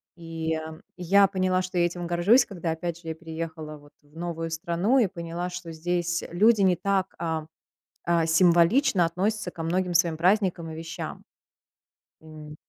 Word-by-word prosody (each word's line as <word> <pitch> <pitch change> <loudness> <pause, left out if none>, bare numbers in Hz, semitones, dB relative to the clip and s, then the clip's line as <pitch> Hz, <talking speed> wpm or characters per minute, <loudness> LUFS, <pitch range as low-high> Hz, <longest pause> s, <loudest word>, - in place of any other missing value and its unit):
И, 165 -1 -4
эм, 160 0 -7 0.2
я 195 +3 +4
поняла, 185 -1 0
что 185 0 -5
я 175 - +4
этим 175 0 -4
горжусь, 175 +9 +4
когда, 175 -4 -4
опять 170 +1 -4
же, 165 - -13
я 160 - -3
переехала 160 -2 -7
вот 145 0 -19
в 145 +1 -26
новую 165 -1 -4
страну 175 +10 +1
и 220 - +3
поняла, 170 0 -5
что 175 -2 -7
здесь, 175 +1 -1
э, - - -9
люди 210 +4 +4
не 185 -2 +4
так, 195 0 -1
а 160 -2 -2 0.6
а 170 -1 +2
символично 175 - +4
относятся 190 +3 -2
ко 165 - -8
многим 180 +2 -1
своим 170 -2 +2
праздникам 180 -2 +1
и - - -7
вещам. 165 0 -7 1.0
М. 155 -1 -11
170 Hz, 170 wpm, -26 LUFS, 165-185 Hz, 1.0 s, я